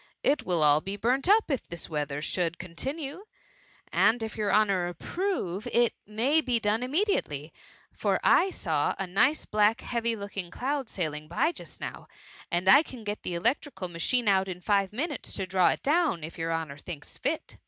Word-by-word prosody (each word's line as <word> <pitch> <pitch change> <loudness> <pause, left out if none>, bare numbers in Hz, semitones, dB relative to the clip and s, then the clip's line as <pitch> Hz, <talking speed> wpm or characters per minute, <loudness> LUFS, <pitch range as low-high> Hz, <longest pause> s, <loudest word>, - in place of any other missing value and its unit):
It 285 - +3
wiU 155 -4 +3
be 195 - -3
all - - -9
burnt 255 - +1
up, 425 -5 +4
if 265 - -2
this 170 -1 -5
weather 150 -2 -3
should 175 -1 -1
continue; 270 - -5 0.7
and 225 +1 +3
if 220 - -5
your 210 -2 0
honour 200 -4 +3
approve, 210 - -3
it 240 -1 +3
may 245 +9 +2
be 245 -4 +1
done 215 +1 +1
immediately, 250 - -1 0.4
for - - 0
I 365 +2 +5
saw 160 - -1
a 195 - -2
nice 200 +12 +2
black 210 +1 +2
heavy* 235 -1 -1
looking 200 -3 -6
cloud 265 +6 -2
sailing 155 -4 -3
by 175 - +1
just - - -10
now, - - -7 0.4
and 175 +2 -1
I 275 +9 +9
can 255 -7 -10
get 205 0 -4
the 175 - -4
electrical 195 - -1
machine 215 +8 +1
out 190 -1 +3
in 180 -1 -5
five 200 0 +1
minutes 280 +11 -4
to 190 - -3
draw 185 -1 +3
it - - -2
down, 295 - +2
if 160 - -7
your 165 0 -2
honour 160 -3 -3
thinks 150 -2 -8
fit. 300 +4 -3
205 Hz, 185 wpm, -28 LUFS, 175-265 Hz, 0.7 s, I